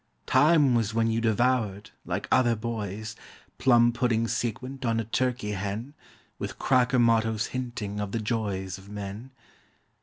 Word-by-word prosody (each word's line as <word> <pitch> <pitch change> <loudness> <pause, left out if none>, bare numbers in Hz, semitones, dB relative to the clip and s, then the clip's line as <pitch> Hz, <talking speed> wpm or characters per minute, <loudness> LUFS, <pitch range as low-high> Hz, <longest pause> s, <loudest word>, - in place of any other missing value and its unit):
Time 145 0 +4
was 110 -2 0
when 115 0 +2
you 115 +1 0
devoured, 110 -3 +1
like - - -3
other 120 -2 +4
boys, 110 -1 -4 0.4
Plum 120 -2 +5
pudding 115 -2 +1
sequent 125 +4 -3
on 115 -2 +1
a - - -1
turkey 125 -2 -1
hen; 105 +7 -4 0.5
With - - -5
cracker 125 0 +2
mottos 110 -2 +2
hinting 120 -5 -4
of 105 -1 -3
the 115 - -1
joys 100 -4 -2
Of 95 +1 -15
men. 105 +4 -7
115 Hz, 145 wpm, -27 LUFS, 105-125 Hz, 0.5 s, Plum